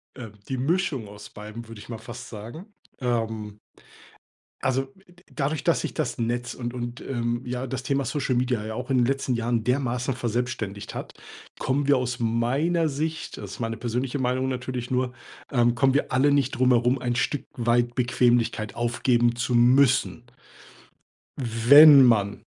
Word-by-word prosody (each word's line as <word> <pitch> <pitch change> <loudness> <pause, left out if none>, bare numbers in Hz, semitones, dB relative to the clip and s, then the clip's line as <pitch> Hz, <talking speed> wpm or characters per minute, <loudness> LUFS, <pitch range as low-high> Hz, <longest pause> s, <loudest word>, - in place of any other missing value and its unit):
Ähm, 115 -6 -9 0.2
die 130 - -2
Mischung 140 - -1
aus 105 0 -11
beidem 110 +2 -9
würde 115 -2 -10
ich - - -12
mal 115 -2 -6
fast 120 - -9
sagen, 120 - -10 0.3
ähm 110 -4 -3 1.1
Also, 130 +1 +1 0.2
d 175 +1 -22
dadurch 150 +1 -2
dass - - +2
sich - - -4
das - - -3
Netz 120 +1 -2
und 120 -1 -5
und, 120 -1 -6
ähm, 120 -2 -2
ja, 125 +1 -4
das 130 0 -4
Thema 140 +2 0
Social 130 -1 -1
Media 125 -3 0
ja 110 0 -5
auch 125 +2 -6
in 130 - +3
den 120 - +3
letzten 135 -1 -1
Jahren 115 -1 -1
dermaßen 125 0 0
verselbstständigt 120 -4 -3
hat, - - -7 0.4
kommen 140 +2 -1
wir 145 - +5
aus 125 -1 -2
meiner 135 +9 +1
Sicht 155 +3 -4
also, - - -8
das 95 - -12
ist - - -12
meine 115 -1 -2
persönliche 125 +4 -3
Meinung 130 +1 0
natürlich 125 -1 -4
nur, 125 0 0 0.4
ähm, 120 -2 +2
kommen 135 +1 +2
wir 145 - 0
alle 130 +3 +3
nicht 140 -2 +2
drum 130 +1 +2
herum, 125 +2 +3
ein 120 -1 -1
Stück 140 +3 -1
weit 120 0 +1
Bequemlichkeit 120 -3 +1
aufgeben 120 0 +1
zu 120 0 -1
müssen. 125 0 +3 1.2
W 115 -2 -4
wenn 145 -1 +10
man 105 -5 +2
125 Hz, 175 wpm, -25 LUFS, 115-130 Hz, 1.2 s, wenn